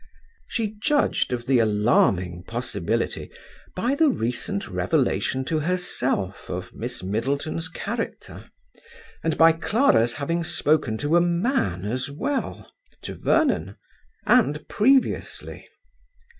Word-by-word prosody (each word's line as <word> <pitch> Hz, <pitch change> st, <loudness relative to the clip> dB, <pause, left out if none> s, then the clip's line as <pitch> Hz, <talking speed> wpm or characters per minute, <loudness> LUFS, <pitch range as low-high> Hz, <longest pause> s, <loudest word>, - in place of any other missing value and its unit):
She 220 Hz, -3 st, -2 dB
judged 295 Hz, -, +1 dB
of 120 Hz, -1 st, -3 dB
the 130 Hz, -1 st, +3 dB
alarming 100 Hz, -5 st, +2 dB
possibility 115 Hz, -6 st, -2 dB, 0.5 s
by 235 Hz, +8 st, 0 dB
the 310 Hz, +2 st, +4 dB
recent 200 Hz, -, -2 dB
revelation 130 Hz, -3 st, 0 dB
to 160 Hz, +2 st, 0 dB
herself 145 Hz, -, -2 dB
of -, -, -5 dB
Miss -, -, -5 dB
Middleton's 140 Hz, -, -2 dB
character, 230 Hz, +7 st, -6 dB, 0.7 s
and 160 Hz, -1 st, 0 dB
by 165 Hz, 0 st, +7 dB
Clara's 160 Hz, -, +2 dB
having 165 Hz, +4 st, -2 dB
spoken 155 Hz, -8 st, +1 dB
to 150 Hz, +7 st, +2 dB
a -, -, +5 dB
man 170 Hz, -, 0 dB
as 125 Hz, +6 st, -2 dB
well 265 Hz, -, -3 dB, 0.3 s
(to -, -, -5 dB
Vernon), -, -, +1 dB, 0.5 s
and 185 Hz, -, +3 dB
previously. 265 Hz, +5 st, +1 dB
150 Hz, 110 wpm, -24 LUFS, 120-185 Hz, 0.7 s, by